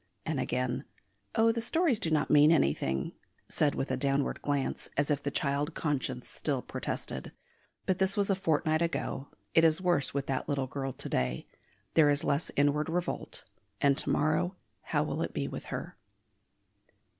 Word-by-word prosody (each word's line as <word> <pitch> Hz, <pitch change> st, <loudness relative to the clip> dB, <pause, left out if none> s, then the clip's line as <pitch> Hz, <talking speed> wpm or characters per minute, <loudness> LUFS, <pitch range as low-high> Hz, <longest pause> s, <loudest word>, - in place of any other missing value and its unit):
And 155 Hz, -4 st, -1 dB
again, 125 Hz, -1 st, -1 dB, 0.5 s
"Oh, 225 Hz, +1 st, +5 dB
the 230 Hz, 0 st, -2 dB
stories 315 Hz, -1 st, +2 dB
do 165 Hz, -, +1 dB
not 155 Hz, -2 st, +1 dB
mean 150 Hz, +1 st, +7 dB
anything," 70 Hz, -, +1 dB, 0.4 s
said 145 Hz, -2 st, +1 dB
with 135 Hz, -, -2 dB
a -, -, +2 dB
downward 140 Hz, 0 st, 0 dB
glance, 145 Hz, -2 st, -1 dB
as 145 Hz, +1 st, +2 dB
if 145 Hz, -1 st, +1 dB
the 140 Hz, -, -1 dB
child 145 Hz, +3 st, -1 dB
conscience 145 Hz, -4 st, -1 dB
still -, -, -1 dB
protested. -, -, -4 dB, 0.5 s
But 185 Hz, 0 st, +1 dB
this 190 Hz, +1 st, +2 dB
was 200 Hz, 0 st, +2 dB
a -, -, +3 dB
fortnight 155 Hz, -3 st, +1 dB
ago. 165 Hz, -4 st, -2 dB, 0.3 s
It 165 Hz, -, +6 dB
is 160 Hz, -1 st, +5 dB
worse 175 Hz, -7 st, +2 dB
with 140 Hz, 0 st, -2 dB
that 135 Hz, +2 st, -2 dB
little 140 Hz, -2 st, 0 dB
girl 135 Hz, +1 st, -3 dB
to -, -, -6 dB
day; 65 Hz, 0 st, -1 dB, 0.5 s
there 155 Hz, -3 st, +6 dB
is 145 Hz, 0 st, +2 dB
less 140 Hz, +3 st, 0 dB
inward 145 Hz, +2 st, +2 dB
revolt; 175 Hz, +1 st, -2 dB, 0.4 s
and 140 Hz, -1 st, +4 dB
to -, -, -1 dB
morrow 155 Hz, +5 st, +1 dB, 0.3 s
how -, -, 0 dB
will -, -, -2 dB
it -, -, -3 dB
be -, -, -1 dB
with -, -, -6 dB
her? -, -, -5 dB
145 Hz, 175 wpm, -30 LUFS, 140-165 Hz, 0.5 s, mean